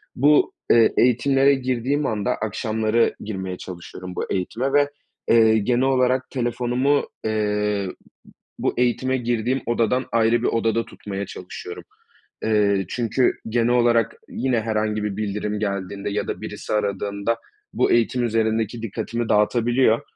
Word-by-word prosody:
Bu, 145 +3 +4 0.2
eee, 115 -1 +5
eğitimlere 135 +3 +4
girdiğim 130 +2 -1
anda 105 -5 0
akşamları 110 +1 0
girmeye 95 -3 -5
çalışıyorum 90 +1 -9
bu - - -4
eğitime 115 +8 -1
ve, 145 0 +4 0.4
eee, 110 -1 +5
genel 120 +4 +1
olarak 130 -1 +2
telefonumu, 125 +3 0 0.2
eee, 105 -2 0
b - - -7 0.7
bu - - 0
eğitime 125 +2 +1
girdiğim 120 +1 -1
odadan 120 +2 +1
ayrı 115 0 +3
bir - - +1
odada 115 0 +1
tutmaya 100 -1 -6
çalışıyorum. - - -8 0.6
Eee, 100 -3 +2
çünkü 120 +1 +1 0.2
genel 115 +1 +1
olarak 120 -2 +3
yine 125 -4 0
herhangi 110 -1 -1
bir 105 -2 -3
bildirim 105 0 -2
geldiğinde 100 -1 -3
ya 100 - -2
da - - -4
birisi - - -5
aradığında 100 +1 -1 0.4
bu - - +2
eğitim 120 +1 +2
üzerindeki 110 0 0
dikkatimi 115 +2 -3
dağıtabiliyor 115 +2 +3
115 Hz, 130 wpm, -23 LUFS, 105-125 Hz, 0.7 s, eee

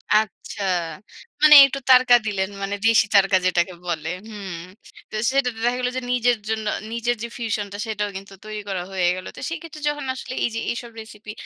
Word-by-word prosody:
আচ্ছা। 215 -1 -1 0.8
মানে 305 -1 +9
একটু 275 0 -3
তারকা 255 -1 +7
দিলেন। 195 -2 -1
মানে 200 +1 -2
দেশি 225 -1 +5
তারকা 195 -1 +5
যেটাকে 180 0 +1
বলে। 160 -3 -3 0.2
হুম। 200 -4 -7 0.6
তো - - -8 0.2
সেটাতে 250 -4 0
দেখা 245 +1 +1
গেল 250 0 0
যে - - -2
নিজের 245 -1 +2
জন্য, 220 -1 -2 0.3
নিজের 235 +1 -1
যে 235 - -3
ফিউশন 220 -3 -2
টা 205 - -5
সেটাও 210 -2 -2
কিন্তু 195 0 -11
তৈরি 215 -1 -6
করা 185 -2 -2
হয়ে 185 -2 0
গেল। 185 0 -8
তো - - -10
সেক্ষেত্রে 330 -2 -8
যখন 295 -2 -4
আসলে 255 0 -7
এই - - +1
যে - - -1
এইসব 235 0 -6
রেসিপি 215 -1 -11
220 Hz, 190 wpm, -22 LUFS, 200-245 Hz, 0.8 s, মানে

